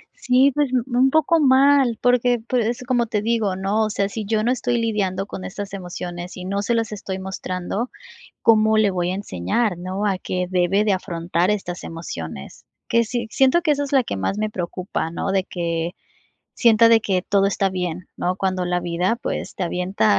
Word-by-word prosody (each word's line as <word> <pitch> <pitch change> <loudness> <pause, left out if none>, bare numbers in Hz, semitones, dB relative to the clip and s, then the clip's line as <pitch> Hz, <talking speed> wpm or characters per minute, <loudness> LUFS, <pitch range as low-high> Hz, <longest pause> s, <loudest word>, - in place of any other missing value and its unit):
Sí, 270 - +3
pues, 295 -3 +1
u 245 -2 +2
un 265 +1 +5
poco 315 +2 +3
mal, 270 -3 +4
porque, 245 -1 +3
pues, 245 -3 +1
es 245 +1 -3
como 245 -2 +1
te 210 -2 -1
digo, 220 -4 0
¿no? 200 +3 0
O - - -2
sea, 200 -1 -1
si 215 0 -5
yo 215 0 0
no 245 - +2
estoy 245 -1 0
lidiando 200 -4 -1
con 185 - -7
estas 200 0 -6
emociones 180 -1 -6
y 180 - -7
no 200 +1 -1
se 235 +3 0
las 225 -1 -1
estoy 190 -2 -5
mostrando, 190 +4 -4 0.5
¿cómo 220 -1 +4
le 210 -2 +4
voy 180 -1 -1
a - - -1
enseñar, 195 - -1
no? 190 +3 -3
A 190 -2 0
qué 180 -1 -2
debe 185 +3 +2
de 205 - +2
afrontar, 175 0 -1
estas 180 -4 -3
emociones. 80 - -7 0.2
Que 235 0 +3
sí 235 0 -3
siento 270 +6 +4
que 305 -4 +3
eso 285 0 -1
es 280 - -8
la 265 -3 +4
que - - -4
más 95 - -2
me 215 0 -1
preocupa, 180 -2 -3
¿no? 195 - -3
De 190 -1 +1
que 170 -2 -2 0.6
sienta 230 -1 +5
de 225 -1 +6
que 185 -3 0
todo 195 -1 +2
está 195 0 +1
bien, 180 -1 -4
¿no? 180 +1 -1
Cuando 185 -2 -1
la 180 0 0
vida, 180 +6 0
pues, - - -4
te 190 - -4
avienta, 180 - +1
200 Hz, 205 wpm, -22 LUFS, 180-235 Hz, 0.6 s, de